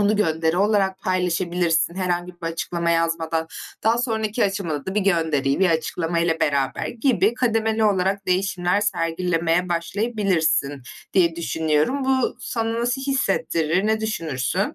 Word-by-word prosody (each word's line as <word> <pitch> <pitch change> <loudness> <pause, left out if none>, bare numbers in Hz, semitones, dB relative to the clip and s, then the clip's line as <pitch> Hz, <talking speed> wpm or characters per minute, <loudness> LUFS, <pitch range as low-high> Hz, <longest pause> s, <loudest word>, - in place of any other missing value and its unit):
onu 205 +1 +3
gönderi 160 -4 +1
olarak 195 -1 +2
paylaşabilirsin, 175 -2 0
herhangi 180 -1 -2
bir 175 -1 -8
açıklama 170 +1 -2
yazmadan. 165 -1 0 0.4
Daha 230 +2 +3
sonraki 220 -2 0
aşamada 190 -7 -2
da 190 - -3
bir 210 - +2
gönderiyi, 160 -6 +1
bir 185 -2 +4
açıklamayla 165 +1 0
beraber 140 -2 0
gibi 235 -1 +1
kademeli 225 -2 +1
olarak 195 -1 +1
değişimler 185 0 +1
sergilemeye 170 -1 0
başlayabilirsin 175 - 0 0.3
diye 170 -3 +3
düşünüyorum. 160 - 0
Bu 260 -2 +1
sana 230 -1 -2
nasıl 245 +3 -1
hissettirir, 195 - 0
ne 220 0 +1
düşünürsün? 165 - -2
180 Hz, 125 wpm, -22 LUFS, 165-210 Hz, 0.4 s, bir